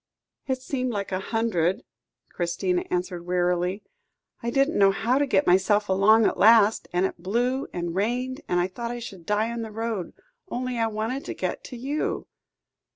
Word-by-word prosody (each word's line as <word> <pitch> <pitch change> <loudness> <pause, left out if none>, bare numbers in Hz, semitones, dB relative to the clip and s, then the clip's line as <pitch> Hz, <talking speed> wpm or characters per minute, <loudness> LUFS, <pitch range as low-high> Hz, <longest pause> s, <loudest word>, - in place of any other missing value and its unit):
"It 260 -1 0
seemed 255 -1 -2
like 200 -3 -3
a 185 - 0
hundred," 195 -5 0 0.5
Christina 180 +1 -1
answered 180 -1 -2
wearily. 180 +2 0 0.6
"I 235 - -2
didn't 275 +3 +2
know 195 -1 +7
how 230 +7 +1
to 285 - +2
get 195 -6 +2
myself 205 +3 +3
along 210 +4 +5
at - - 0
last; 220 0 +5
and 180 +2 +2
it 185 - -4
blew 245 +8 0
and 175 -1 -3
rained, 250 - -1
and 175 - +1
I 175 - +2
thought 235 +5 -5
I 240 - -4
should 195 -8 -9
die 215 +2 +1
on 235 0 -4
the 225 - -5
road. 220 -4 -4 0.4
Only 250 -1 -3
I 225 - +2
wanted 225 +5 -3
to - - -5
get - - -3
to 250 - -8
you." 275 +5 -2
215 Hz, 180 wpm, -25 LUFS, 185-240 Hz, 0.6 s, know